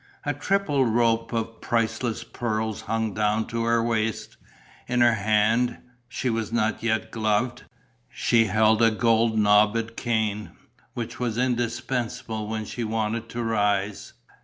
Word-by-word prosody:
A - - -1
triple 195 -9 +1
rope 115 -1 +1
of 115 -1 -3
priceless 115 0 -1
pearls 110 -2 -3
hung 110 -2 -2
down 105 +1 +1
to 115 0 -2
her 115 0 +2
waist. 115 -2 -2 0.5
In 125 0 +1
her 120 -1 +6
hand 110 +3 +2 0.3
she 130 - -3
was 115 -2 -1
not 110 -1 0
yet 110 -1 -1
gloved 110 +2 -1 0.4
she 115 -1 +2
held 110 +2 +3
a 115 - +6
gold 115 0 +2
knobbed 105 +2 +3
cane, 110 -3 -1 0.4
which 120 -1 -5
was 120 -3 -2
indispensable 120 -2 -2
when 110 0 -3
she 120 - -5
wanted 110 +1 -2
to 120 0 -4
rise. 105 -2 -1
115 Hz, 135 wpm, -25 LUFS, 110-120 Hz, 0.5 s, her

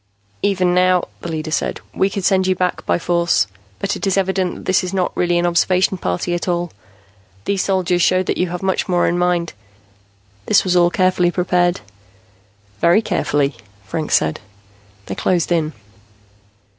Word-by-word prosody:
"Even 185 -3 +1
now," 180 0 +3
the 170 - -5
leader 155 -1 -4
said, - - -1
"we 190 - +1
could 195 -2 -4
send 190 -1 +3
you 185 - +2
back 180 -1 -1
by - - +2
force. 170 - +1 0.3
But 200 - -2
it - - -3
is 195 - +1
evident 190 -1 0
that - - -11
this 185 +1 +2
is 185 +1 -4
not 185 -2 -1
really 175 -1 +1
an 175 - +1
observation 180 +2 +2
party 90 - -2
at 175 +1 -3
all. 175 -1 -1 0.7
These 195 -2 0
soldiers 180 -2 +1
show 185 +1 +3
that - - -2
you 180 - +1
have 180 +1 -5
much 190 0 0
more 175 -1 +2
in 175 +1 0
mind; 175 -1 0 0.9
this - - +4
was 180 -1 0
all 175 -1 +5
carefully 185 -1 +2
prepared." 175 - +1 1.0
"Very 175 +6 +4
carefully," 145 - 0 0.3
Franks 155 +10 -1
said. 80 0 +1 0.7
They - - -5
closed 175 -2 0
in. 160 -3 +1
180 Hz, 170 wpm, -19 LUFS, 170-185 Hz, 1.0 s, all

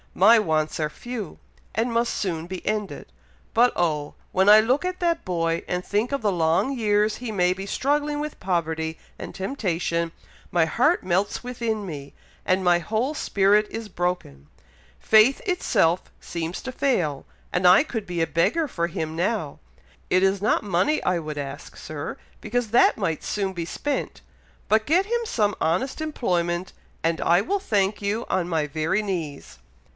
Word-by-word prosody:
My 220 +5 +7
wants 155 -6 0
are 155 -1 0
few, 230 +1 -7 0.4
and 230 +3 0
must 235 +1 +1
soon 170 -5 -2
be 185 0 -7
ended. 210 -8 -3 0.4
But 245 +2 +5
oh! 150 -4 -1 0.2
when 190 +2 +4
I 210 +1 +10
look 250 +8 +2
at 365 0 -3
that 340 -1 0
boy, 165 -2 -1
and 180 0 -2
think 210 +5 0
of 275 -4 -2
the 205 - +2
long 170 +10 +1
years 210 -1 +2
he 240 -2 -5
may 180 -3 +2
be 195 +1 -7
struggling 290 +5 0
with 300 0 -5
poverty 160 -3 -1 0.2
and - - -8
temptation, 175 -6 -2 0.4
my 170 -2 +3
heart 255 - +2
melts 190 +5 0
within 230 -4 -3
me, 145 -5 -7 0.3
and 185 +1 +2
my 175 -1 +4
whole 225 - -1
spirit 210 -6 +2
is 225 -1 -6
broken. 175 - -3 0.5
Faith 220 - +5
itself 200 - +1
seems 170 +1 -5
to 260 - -4
fail, 175 - 0 0.3
and 180 +1 +1
I 185 +9 +7
could 225 -9 -4
be 175 -2 -2
a 165 - +2
beggar 310 - +1
for 170 -9 -2
him 160 -3 -4
now! 175 -3 -1 0.5
It 185 +1 +3
is 195 0 +2
not 215 - +2
money 205 - +1
I 180 -1 +1
would 155 -2 -6
ask, 140 0 -7
Sir, 155 -1 -6 0.2
because 230 0 -2
that 240 - +5
might 165 -7 -2
soon 195 -2 -2
be 170 -2 -4
spent; 290 - -3 0.5
but 220 0 +2
get 355 +6 +3
him 475 +3 0
some 210 - 0
honest 185 - 0
employment, 180 - -1 0.3
and 165 0 0
I 175 +1 +4
will 395 - 0
thank 205 - 0
you 205 +3 -1
on 180 -2 0
my 160 -3 +1
very 160 +8 -1
knees." 165 -8 -5
190 Hz, 170 wpm, -24 LUFS, 170-230 Hz, 0.5 s, I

